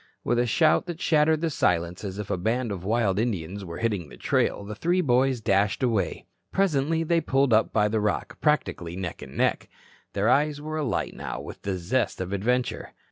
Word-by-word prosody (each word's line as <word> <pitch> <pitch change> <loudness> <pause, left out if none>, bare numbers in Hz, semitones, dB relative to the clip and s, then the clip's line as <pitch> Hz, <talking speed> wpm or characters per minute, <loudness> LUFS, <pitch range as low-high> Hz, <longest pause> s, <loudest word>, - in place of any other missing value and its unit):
With 120 - +1
a 120 - +2
shout 155 +9 +3
that 170 -2 -5
shattered 155 -1 +3
the 165 -1 0
silence 85 - 0
as 95 -1 -5
if 105 -1 -5
a - - +2
band 115 +4 0
of 95 -3 -5
wild 105 -2 +1
Indians 100 -4 -2
were 85 -2 -7
hitting 100 -9 -1
the - - -12
trail, - - 0
the 105 - -6
three 175 - +1
boys 130 -4 +2
dashed 100 +2 +1
away. 115 -6 0 0.3
Presently 165 -4 +1
they 165 +1 +2
pulled 135 -4 +2
up 110 - +3
by 105 -1 +3
the 110 +1 0
rock, 105 0 -2
practically 90 - 0
neck 90 -2 -5
and - - -10
neck. - - +1 0.4
Their 100 +2 +1
eyes 145 +4 +3
were 155 +1 -4
alight 145 -6 -1
now - - -5
with - - -9
the 95 -2 -2
zest 115 +9 -1
of 95 +1 -3
adventure. 125 +5 -1
115 Hz, 200 wpm, -26 LUFS, 100-145 Hz, 0.4 s, shout